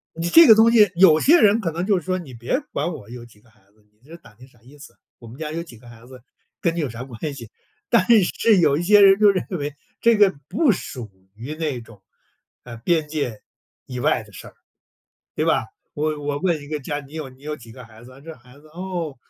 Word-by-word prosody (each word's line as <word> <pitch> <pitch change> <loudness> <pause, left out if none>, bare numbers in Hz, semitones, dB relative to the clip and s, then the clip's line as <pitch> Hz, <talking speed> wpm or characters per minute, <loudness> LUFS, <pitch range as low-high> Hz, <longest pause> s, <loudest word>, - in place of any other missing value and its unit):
你 165 +1 -3
这 330 - +8
个 220 - +9
东 225 +2 +5
西 215 -4 +5
有 170 -3 +5
些 335 +5 +5
人 210 +2 +4
可 170 - -2
能 170 +3 -4
就 200 -2 +2
是 170 - -10
说： 185 0 -2
“你 140 -7 -12
别 120 - -2
管 175 - -2
我 105 -10 -11
有 120 0 -10
几 110 -3 -20
个 115 - -27
孩 110 -1 -30
子， 105 0 -32
你 110 +5 -30
这 165 - -11
打 115 -10 -20
听 125 +4 -17
啥 125 -3 -26
意 130 +5 -18
思？ 140 - -14 0.2
我 120 - -14
们 115 +4 -13
家 155 -1 -5
有 165 +1 -4
几 125 -9 -14
个 120 +1 -17
孩 120 0 -15
子 130 -1 -14 0.4
跟 170 - 0
你 - - -1
有 145 -5 -3
啥 115 +2 -8
关 135 +4 -7
系？” 115 -5 -11 0.4
但 185 - +2 0.2
是， 210 +3 +2
有 150 -5 +3
一 160 - -2
些 205 +3 +5
人 195 -1 +6
就 210 -1 +5
认 190 -2 -2
为 145 0 -5 0.3
这 230 -1 +4
个 205 -2 +4
不 255 - +2
属 125 - -7 0.2
于 120 +8 -8
那 155 -6 -4
种， 110 -4 -17 0.6
呃， 120 -2 -10
边 155 +5 0
界 140 -8 -4 0.4
以 125 -1 -6
外 - - +1
的 105 -1 -18
事 - - -11
儿， - - -19 0.8
对 - - -1
吧？ - - +1 0.3
我 155 0 -2
我 145 0 -3
问 170 -2 -1
一 145 - -12
个 155 0 -3
家： 145 +2 -4
“你 140 +3 -16
有 155 -4 -6
你 130 +1 -21
有 150 +1 -5
几 115 -5 -15
个 125 +1 -12
孩 115 0 -17
子 130 - -14
啊？ 130 - -16
这 160 +2 -10
孩 125 +1 -20
子， 155 +2 -20
哦， 170 -3 -6
150 Hz, 275 characters per minute, -21 LUFS, 120-175 Hz, 0.8 s, 个